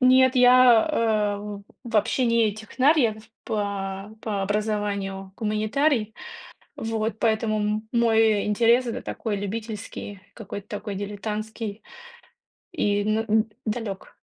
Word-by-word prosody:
Нет, 260 0 +5
я, 250 0 +6 0.5
э, 205 -1 -7 0.2
вообще 230 +2 +1
не 230 -2 +3
технарь, 260 +8 +2
я 220 -4 +2 0.3
по 200 -1 -3
по 205 -3 -2
образованию 200 -2 -2
гуманитарий. 220 +2 0 0.6
Вот 220 0 -2
поэтому 220 -1 +1
м 215 +1 -2
мой 225 -3 +3
интерес 235 +4 +3
это 230 - -4
такой 215 -4 -3
любительский, 205 -1 -6
какой-то 205 -2 -8
такой 205 -1 -5
дилетантский 210 +1 -5 0.9
и 205 -10 +1
н 215 +1 +1
а, 225 - -1 0.4
далек. 215 -3 -4
215 Hz, 110 wpm, -25 LUFS, 205-230 Hz, 0.9 s, я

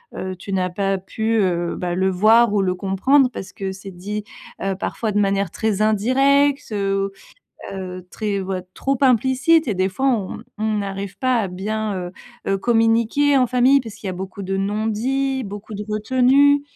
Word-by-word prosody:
heu, 185 0 -4
tu 195 +2 -7
n'as 185 -1 0
pas 195 +1 -1
pu, 220 +4 -2
heu, 175 -2 0
bah, 175 -1 -3
le 190 +1 +2
voir 215 +4 +4
ou 205 - +2
le 185 -1 0
comprendre 225 +9 +3
parce 195 -5 -8
que 190 -1 -5
c'est 195 +1 -10
dit, 205 +4 -5 0.4
heu, 195 0 0
parfois 215 +2 -3
de 205 - +1
manière 200 -1 +1
très 215 -2 -1
indirecte, 270 +7 +2
heu 195 -1 -1 0.6
heu, 185 -2 -7
très 205 -2 -2
ou 190 0 -4
heu, 185 - -4
trop 275 -1 -1
implicite 265 +5 +3
et 215 - 0
des 185 +1 +1
fois 195 - -12
on 215 -8 -1 0.2
on 215 0 0
n'arrive 195 -1 -5
pas 255 -1 +2
à 200 - -2
bien, 210 +3 -3
heu 180 -1 -5 0.4
heu, 195 - +2
communiquer 230 +6 +3
en 255 -2 +4
famille 255 +3 +4
parce 225 -4 -9
qu'il - - -9
y - - -1
a - - -4
beaucoup 190 +2 -7
de 195 0 -2
non-dits, 225 +7 -1
beaucoup 205 +1 -8
de 205 +1 -5
retenue, 260 +6 +3
210 Hz, 190 wpm, -21 LUFS, 195-245 Hz, 0.6 s, voir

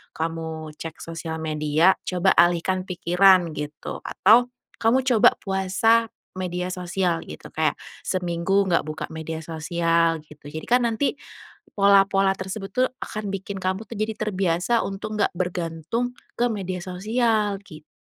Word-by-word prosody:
kamu 160 -1 -4
cek 160 +1 -8
sosial 165 -1 -5
media 155 +3 +2
coba 185 +1 +2
alihkan 175 +2 +3
pikiran 180 -1 +4
gitu 150 0 -6
atau 240 +5 +4 0.3
kamu 245 +4 +3
coba 240 -2 +6
puasa 195 +4 +2 0.2
media 180 -1 -3
sosial 180 -1 -1
gitu - - -10
kayak - - +1 0.3
seminggu 185 +2 0
nggak 170 - +2
buka 155 0 -4
media 160 0 -5
sosial 165 +1 +1
gitu, 150 -1 -13
jadikan 235 +11 +1
nanti 235 +6 0 0.6
pola-pola 195 -1 +5
tersebut 195 +1 -6
tuh 255 0 +3 0.2
akan 210 -2 -5
bikin 195 +1 -5
kamu 190 +3 -2
tuh 230 - -8
jadi 215 +1 -1
terbiasa 190 +2 +1
untuk 200 +2 -5
nggak - - +2
bergantung 180 +6 -2 0.2
ke 240 - +2
media 190 -4 -3
sosial 210 +2 0
gitu. 155 -7 -13
185 Hz, 135 wpm, -24 LUFS, 165-205 Hz, 0.6 s, coba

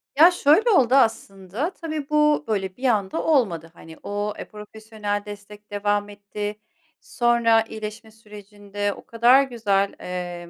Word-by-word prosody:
Ya, 330 +5 +7
şöyle 350 - +3
oldu 265 - +4
aslında, 220 - 0
tabii 310 -5 -6
bu, 300 0 +3
böyle, 195 -4 -3
bir 255 - -14
anda 205 -5 0
olmadı, 185 - 0
hani, 165 - -14
eee, 205 +5 -5
profesyonel 210 -1 -6
destek 205 0 -12
devam 205 0 -1
etti. 205 +1 -6 0.4
Sonra 235 -2 +2
iyileşme 220 0 -8
sürecinde 205 -1 -6
o - - -15
kadar 240 +4 +4
güzel, 205 -6 0
eee, 175 -1 -6
210 Hz, 130 wpm, -23 LUFS, 205-240 Hz, 0.4 s, Ya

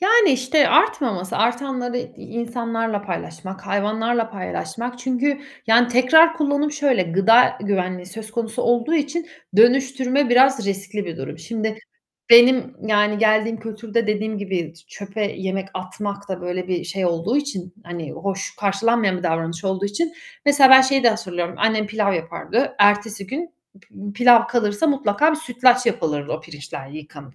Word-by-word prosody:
Yani, 425 0 +5
işte 260 +3 +2
artmaması, 195 - +1
artanları 245 +2 -1
i 245 - -4
insanlarla 230 -2 -4
paylaşmak, 190 0 -7
hayvanlarla 225 +3 -1
paylaşmak 235 +5 -6
çünkü, 260 +3 -1 0.3
yani, 235 +2 +4
tekrar 320 +7 +5
kullanım 295 -1 0
şöyle, 280 -8 +1
gıda 195 +8 +4
güvenliği 185 -3 -2
söz 215 +3 -9
konusu 230 +1 -3
olduğu 240 +6 +1
için 315 +2 -2 0.3
dönüştürme 260 +3 +3
biraz 255 -2 +4
riskli 200 +1 -4
bir 170 -3 -7
durum. 135 +4 -8
Şimdi 220 +3 -4 0.5
benim 250 +2 +6
yani 210 0 +2
geldiğim 215 +1 +2
kültürde 225 +1 -3
dediğim 210 0 -2
gibi 185 -5 -4
t 165 - -20
çöpe 200 +2 -7
yemek 190 0 -4
atmak 200 +2 -6
da 185 -1 -5
böyle 180 +1 -5
bir 180 -1 -2
şey 185 +1 -3
olduğu 175 +9 -1
için, 190 -12 -4
hani, 170 -3 -7
hoş 195 0 -5
karşılanmayan 205 -1 0
bir 180 - -9
davranış 165 +2 -3
olduğu 190 0 -2
için... 260 +12 -2 0.3
Mesela 280 -2 +6
ben 265 - +10
şeyi 270 +1 +2
de 240 - +6
hatırlıyorum. 175 -6 -3
Annem 215 -1 +1
pilav 210 -1 0
yapardı. 170 - -2
Ertesi 205 0 +2
gün 325 - -5 0.3
p 200 +1 -10
pilav 240 0 +6
kalırsa 235 +2 0
mutlaka 280 +1 +2
bir 315 - -1
sütlaç 250 -4 +2
yapılırdı 150 -8 -2
o 155 - -4
pirinçler 145 -3 -10
yıkanıp. 145 -2 -12
220 Hz, 150 wpm, -21 LUFS, 190-250 Hz, 0.5 s, ben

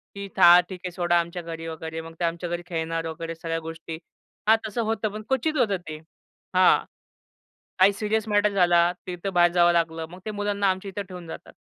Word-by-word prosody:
की 200 0 -6
था, 175 +1 +9
ठीक 185 -2 -7
आहे 180 - -3
सोडा 175 0 +2
आमच्या 170 +1 -4
घरी 165 -1 -7
वगैरे, 160 0 -6
मग 165 0 -10
ते 175 - -2
आमच्या 170 +1 -3
घरी 175 0 -3
खेळणार 165 -1 -2
वगैरे 165 +1 -5
सगळ्या 165 0 -3
गोष्टी. 165 0 -7 0.5
हां, 220 - +7
तसं 230 +3 -2
होतं, 220 -1 -1
पण 215 +1 -6
क्वचित 275 +4 0
होतं 205 -6 +2
ते. 155 - -5 0.6
हां, 185 0 +5 1.0
काही 195 +2 +6
सीरियस 215 +2 -1
मॅटर 210 0 +3
झाला 175 -2 +4
तिथं 180 +2 -4
बाहेर 175 0 +5
जावं 175 0 +5
लागलं. 165 -1 0
मग 180 +1 -11
ते 215 - -4
मुलांना 205 -1 -1
आमच्या 190 +1 -3
इथे 200 +1 -4
ठेवून 180 -3 -10
जातात. - - -10
175 Hz, 200 wpm, -25 LUFS, 165-200 Hz, 1.0 s, था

